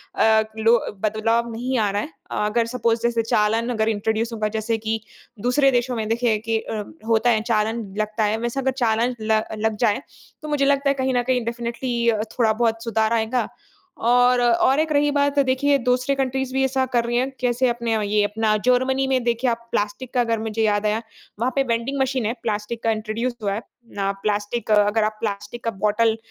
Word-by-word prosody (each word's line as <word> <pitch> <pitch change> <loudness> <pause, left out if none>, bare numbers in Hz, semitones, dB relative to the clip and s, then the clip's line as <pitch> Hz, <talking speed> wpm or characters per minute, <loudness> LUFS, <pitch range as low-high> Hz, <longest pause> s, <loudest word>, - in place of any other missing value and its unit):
अ, 220 0 +4
लो 225 +2 +4 0.3
बदलाव 225 +2 +1
नहीं 250 +3 -2
आ 210 -2 +2
रहा 205 +1 -1
है। 305 - -7 0.4
अगर 230 +2 +1
सपोज़ 230 -1 0
जैसे 235 -1 +2
चालान 225 +2 +1
अगर 220 -2 +1
इंट्रोड्यूस 220 +2 -1
होगा 215 -1 -1
जैसे 225 +1 -1
कि 220 0 -2 0.4
दूसरे 270 +3 +3
देशों 245 0 0
में 220 -1 -2
देखिए 230 -1 +1
कि 225 +1 -1
अ, 215 -1 -4 0.2
होता 230 +1 +3
है 220 -2 +3
चालान 225 0 0
लगता 215 +1 -1
है 210 +1 +1
वैसे 240 +3 -2
अगर 265 0 +1
चालान 235 +2 +1
ल 215 0 +2 0.2
लग 220 0 0
जाए 215 +4 +1 0.4
तो 305 - -7
मुझे 290 -2 +1
लगता 280 0 +2
है 275 - +4
कहीं 260 - +1
न 245 - +2
कहीं 250 -2 0
डेफिनेटली 235 0 -1 0.3
थोड़ा 220 -2 +4
बहुत 225 0 0
सुधार 220 -1 +1
आएगा 230 +2 0 0.6
और 245 +1 +4
और 245 +4 +3
एक 315 0 0
रही 290 0 +3
बात 285 0 +1
देखिए 280 +2 +2
दूसरे 250 +3 +1
कंट्रीज़ 265 -1 -1
भी 265 0 +1
ऐसा 265 0 +1
कर 235 -1 +2
रही 240 0 0
है। 260 +2 +1
कैसे 250 +1 +1
अपने 235 -1 -2 0.2
ये 210 0 +2
अपना 215 +1 +1
जर्मनी 260 +2 +2
में 260 -2 +1
देखिए 235 +1 +1
आप 235 0 -3
प्लास्टिक 205 +5 -2
का 250 - +3
अगर 230 -2 0
मुझे 220 0 -3
याद 210 -1 +1
आया 215 +2 +1 0.4
वहाँ 250 +3 +1
पे 275 - +3
वेंडिंग 240 +3 -1
मशीन 260 -3 0
है, 225 - 0
प्लास्टिक 215 +1 -3
का 225 - +2
इंट्रोड्यूस 220 +3 -2
हुआ 200 - 0
है। 210 - -3 0.6
प्लास्टिक 210 +2 -1
अगर 210 +1 +4
आप 215 0 -3
प्लास्टिक 205 +2 -4
का 230 - 0
बॉटल 220 +1 +2
230 Hz, 200 wpm, -22 LUFS, 220-250 Hz, 0.6 s, अ